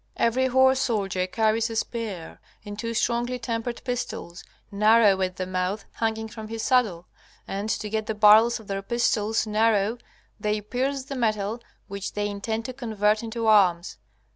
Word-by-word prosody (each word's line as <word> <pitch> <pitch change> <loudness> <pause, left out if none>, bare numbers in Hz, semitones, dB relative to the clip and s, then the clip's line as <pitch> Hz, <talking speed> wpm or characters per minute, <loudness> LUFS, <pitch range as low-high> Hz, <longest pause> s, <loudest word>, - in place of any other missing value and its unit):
Every 255 +3 +2
horse 260 +1 +4
soldier 195 -7 -1
carries 220 +3 +1
a 225 - -5
spear 220 -7 -4 0.3
and 205 0 -7
two 230 +1 -3
strongly 240 +2 0
tempered 230 0 -4
pistols, 230 -8 -5 0.3
narrow 210 -1 +4
at 185 -1 -1
the 185 - -3
mouth, 185 +3 -2
hanging 220 -1 -2
from 220 0 -9
his 225 0 -5
saddle. 215 -10 +1 0.4
And 200 +2 -4
to 220 -1 -2
get 220 0 -2
the 220 - -2
barrels 215 +3 +6
of 220 - -14
their 195 0 -3
pistols 225 0 0
narrow 215 +1 +1 0.4
they 210 0 0
pierce 260 +6 -2
the 275 +1 -7
metal 220 -2 -1 0.3
which 200 0 -5
they 205 0 -1
intend 220 +2 -3
to 255 - -5
convert 215 -4 0
into 230 0 -4
arms. 190 -5 +3
220 Hz, 165 wpm, -25 LUFS, 205-235 Hz, 0.4 s, barrels